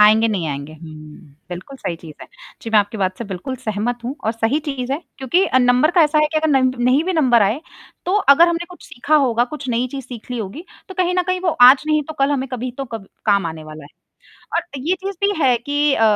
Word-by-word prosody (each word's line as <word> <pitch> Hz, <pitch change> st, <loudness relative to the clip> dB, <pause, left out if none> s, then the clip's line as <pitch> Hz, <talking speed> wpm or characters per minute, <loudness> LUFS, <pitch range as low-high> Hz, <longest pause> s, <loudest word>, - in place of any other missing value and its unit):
आएँगे, 220 Hz, +2 st, +6 dB
नहीं 185 Hz, -6 st, -1 dB
आएँगे, 140 Hz, +1 st, -5 dB
हुँ। 155 Hz, -2 st, -13 dB
बिल्कुल 180 Hz, +10 st, -8 dB
सही 170 Hz, -, -4 dB
चीज़ 160 Hz, -3 st, -12 dB
है। -, -, -11 dB, 0.4 s
जी, 225 Hz, -, -6 dB
मैं 215 Hz, -, +5 dB
आपकी 205 Hz, +2 st, -1 dB
बात 185 Hz, -1 st, -1 dB
से 235 Hz, -, -5 dB
बिल्कुल 200 Hz, +7 st, -6 dB
सहमत 230 Hz, 0 st, -3 dB
हूँ 255 Hz, +4 st, -3 dB
और 220 Hz, -, +1 dB
सही 230 Hz, +5 st, 0 dB
चीज़ 270 Hz, -4 st, -4 dB
है, 280 Hz, -, -1 dB, 0.2 s
क्योंकि 315 Hz, +8 st, +2 dB
अ, 260 Hz, -, +2 dB
नंबर 250 Hz, +4 st, +3 dB
का 350 Hz, -2 st, +4 dB
ऐसा 305 Hz, 0 st, +3 dB
है 305 Hz, -, +4 dB
कि -, -, 0 dB
अगर 315 Hz, -, 0 dB
नंब 260 Hz, -2 st, +3 dB
नहीं 255 Hz, +5 st, +3 dB
भी 375 Hz, -, -1 dB
नंबर 255 Hz, -, +4 dB
आए, 215 Hz, +9 st, +1 dB, 0.5 s
तो 360 Hz, -, 0 dB
अगर 340 Hz, -3 st, +5 dB
हमने 340 Hz, 0 st, -1 dB
कुछ 360 Hz, -, -13 dB
सीखा 300 Hz, +5 st, 0 dB
होगा, 240 Hz, -4 st, +2 dB
कुछ 285 Hz, 0 st, -8 dB
नई 245 Hz, +1 st, 0 dB
चीज़ 270 Hz, -1 st, -6 dB
सीख 245 Hz, 0 st, -11 dB
ली 245 Hz, -, -3 dB
होगी, 225 Hz, -, -6 dB, 0.2 s
तो 380 Hz, -, -9 dB
कहीं 360 Hz, -1 st, 0 dB
न 360 Hz, -, +3 dB
कहीं, 370 Hz, 0 st, 0 dB
वो 365 Hz, -, -1 dB
आज 255 Hz, +2 st, +8 dB
नहीं 305 Hz, -1 st, +2 dB
तो 315 Hz, -, -6 dB
कल, 275 Hz, +1 st, +2 dB
हमें 270 Hz, -2 st, -1 dB
कभी 255 Hz, +1 st, -3 dB
तो 275 Hz, -, -2 dB
कब 225 Hz, -5 st, -8 dB, 0.2 s
काम 200 Hz, -4 st, +3 dB
आने 160 Hz, -1 st, -7 dB
वाला 155 Hz, -1 st, -10 dB
है। 145 Hz, -, -14 dB, 0.7 s
और -, -, +2 dB
अ, 285 Hz, -5 st, -11 dB
ये 330 Hz, +8 st, 0 dB
चीज़ 395 Hz, -, -3 dB
भी 405 Hz, -, +1 dB
है 255 Hz, -2 st, +4 dB
कि 290 Hz, +4 st, 0 dB
अ, -, -, 0 dB
255 Hz, 260 wpm, -19 LUFS, 210-295 Hz, 0.7 s, आज